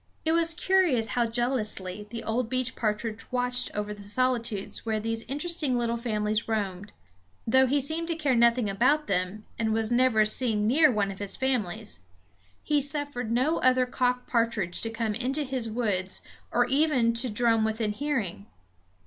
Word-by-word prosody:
It 320 - +2
was 330 0 +3
curious 350 -12 +2
how 240 -1 +1
jealously 215 -5 -2
the 230 0 -6
old 225 +1 -1
beech 255 -1 -2
partridge 215 0 -3
watched 250 0 +1
over 210 0 -3
the 205 - -12
solitudes 230 -1 -1
where 220 -1 -1
these 225 +1 -2
interesting 295 -1 0
little 235 -1 0
families 215 -2 -1
roamed. 205 -3 -3 0.5
Though 260 +3 +4
he 285 +3 +2
seemed 315 +4 -1
to 335 - 0
care 295 -4 0
nothing 235 -1 +3
about 255 +10 +2
them, 190 +2 -2
and 220 -1 +1
was 225 +1 +1
never 240 -3 +4
seen 215 -1 +1
near 295 +6 +5
one 205 -3 0
of 195 - -10
his 200 -1 -3
families, 220 - -2 0.6
he 295 -1 +1
suffered 285 -5 -3
no 260 +8 +1
other 255 0 +3
cock 250 0 -1
partridge 230 -7 -1
to 225 - 0
come 225 -1 -2
into 260 +6 0
his 255 -4 -3
woods, 205 -5 -2 0.3
or 245 0 +2
even 260 -3 +2
to 240 +2 +1
drum 225 0 +2
within 220 -1 -1
hearing. 210 - -3
235 Hz, 165 wpm, -27 LUFS, 215-260 Hz, 0.6 s, near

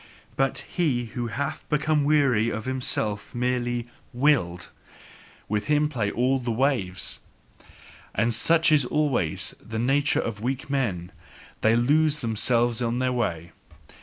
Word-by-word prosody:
But 135 0 0
he 140 -9 0
who 120 -1 -3
hath 140 +6 -3
become 150 0 +1
weary, 140 -7 +3
is 110 -1 -4
himself 125 -6 -2
merely 120 -1 -1 0.3
"willed"; 120 - +1 0.8
with 105 0 -1
him 150 0 +2
play 115 -8 -1
all 130 +5 +1
the 120 -1 -4
waves. 115 -7 0 1.0
And 115 +3 +1
such 165 +7 +3
is 150 -3 +5
always 130 - 0
the 110 - -6
nature 135 +5 +2
of 105 -2 -4
weak 130 +3 -3
men: 100 -11 -1 0.5
they 110 +1 +4
lose 150 +5 +2
themselves 115 +1 +1
on 120 0 0
their 130 0 0
way. 85 -9 -2
125 Hz, 135 wpm, -25 LUFS, 110-140 Hz, 1.0 s, is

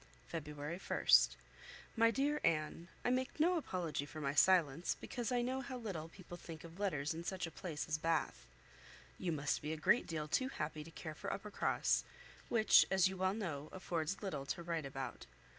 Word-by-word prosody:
"February 150 +1 -5
1st. - - +5 0.6
"MY 230 0 +5
DEAR 285 +5 +1
ANNE, 165 +1 0 0.2
I 245 - +3
make 260 +3 -1
no 350 +4 +4
apology 175 - -2
for 155 - -8
my 140 -2 -1
silence, 165 0 +4
because 240 -3 -3
I 245 -1 +2
know 260 +2 -1
how 260 -1 -5
little 185 -9 -5
people 175 -1 -10
think 165 -2 -9
of 170 +2 -11
letters 155 -7 0
in 165 +1 -5
such 185 +1 -2
a 165 - -7
place 160 -5 -4
as 155 0 0
Bath. 165 - 0 0.7
You 180 - -1
must 145 -2 0
be 150 +1 -2
a - - -4
great 235 +10 +3
deal 155 -3 -3
too 260 - +1
happy 155 - -4
to 160 - -11
care 160 -1 -7
for 200 +6 -5
Uppercross, 200 +1 +1 0.5
which, 220 -2 +7
as 190 -1 +4
you 190 - -6
well 190 +1 +1
know, 155 -9 -4
affords 180 0 -2
little 150 -9 -3
to 170 - -3
write 165 -4 -2
about. 135 -1 -6
170 Hz, 190 wpm, -37 LUFS, 155-200 Hz, 0.7 s, which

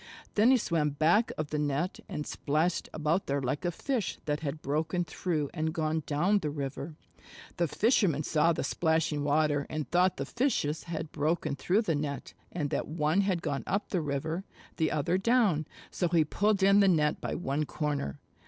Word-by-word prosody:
Then 215 +3 +5
he 260 - +6
swam 165 -9 0
back 160 +10 +3
of 155 -1 -3
the 150 - 0
net 150 +5 -1
and 150 - -4
splashed 155 +4 -1
about 155 +4 0
there 140 +1 0
like 135 +4 -2
a 175 - +1
Fish 245 +4 -2
that 150 -1 -1
had 150 0 -5
broken 160 +5 0
through 155 -3 -2
and 160 -1 -2
gone 155 0 0
down 175 +8 +2
the 155 - -2
river. 145 +1 -5 0.6
The 170 - +2
fisherman 180 - +2
saw 160 +3 +3
the 165 - -1
splashing 160 -3 +1
water 145 -1 +2
and 155 -3 -3
thought 180 +2 +3
the 140 - -2
Fishes 160 - -1
had 165 -2 -5
broken 155 -1 0
through 190 - +1
the 170 - 0
net 145 -1 -3 0.2
and 150 -5 -2
that - - -1
one 155 +4 +1
had 190 -4 0
gone 145 -3 -2
up 200 +3 -1
the 180 - 0
river, 155 +5 -2 0.3
the 160 -2 +2
other 155 +5 0
down, 200 - +2 0.2
so 180 - 0
he 165 -2 +3
pulled 200 +5 +1
in 200 +1 +6
the 200 - +5
net 155 -5 +2
by - - -3
one 150 -2 -1
corner. 145 - -3
155 Hz, 190 wpm, -30 LUFS, 150-180 Hz, 0.6 s, he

